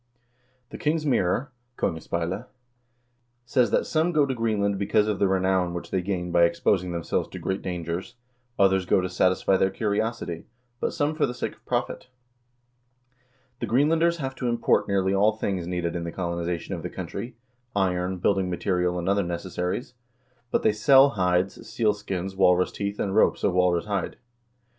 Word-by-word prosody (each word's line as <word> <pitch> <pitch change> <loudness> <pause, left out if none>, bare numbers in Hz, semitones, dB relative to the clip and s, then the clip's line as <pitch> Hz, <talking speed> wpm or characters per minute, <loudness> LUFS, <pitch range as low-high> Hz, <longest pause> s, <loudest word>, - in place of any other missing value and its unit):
"The - - -8
King's 155 +1 0
Mirror" 125 0 +1 0.3
("Kongespeilet") 85 +7 -2 1.0
says 120 -2 +2
that - - +1
"some 160 +2 +1
go 150 -4 +3
to 135 - -2
Greenland 105 -4 0
because 105 +1 +2
of 105 -3 -1
the 100 - +3
renown 95 -2 +1
which 85 - -6
they 95 - +1
gain 90 -2 -3
by 85 0 +5
exposing 90 +1 +1
themselves 85 -1 -2
to - - -8
great 95 +1 -3
dangers; 90 +5 -4 0.4
others 95 -2 +3
go - - +4
to 90 - -2
satisfy 95 +1 +2
their 95 - +2
curiosity, 105 -4 -2 0.3
but - - -1
some 145 +1 0
for 155 -2 +1
the 125 - -5
sake - - -3
of - - -25
profit. - - -2 1.5
The 120 - -3
Greenlanders 160 +8 +3
have 135 -4 -4
to 125 - -2
import 120 -1 +2
nearly 95 -1 +1
all 105 +3 +4
things 95 -5 -3
needed 90 -1 -2
in 85 - -3
the 85 - -4
colonization 85 -1 -3
of - - -4
the - - -5
country: 115 +4 -6 0.4
iron, 90 -1 0
building 95 +1 +1
material, 90 0 0
and 85 0 -3
other 100 +1 +3
necessaries; 90 +5 -3 0.6
but - - 0
they 105 - +4
sell 135 +6 +6
hides, 90 -3 0
seal 110 -1 +1
skins, 95 -2 -5
walrus 90 -1 +3
teeth, 100 0 -4
and 95 -1 -1
ropes - - +3
of - - +2
walrus 90 -1 +2
hide." 100 -3 -2
95 Hz, 170 wpm, -25 LUFS, 90-110 Hz, 1.5 s, sell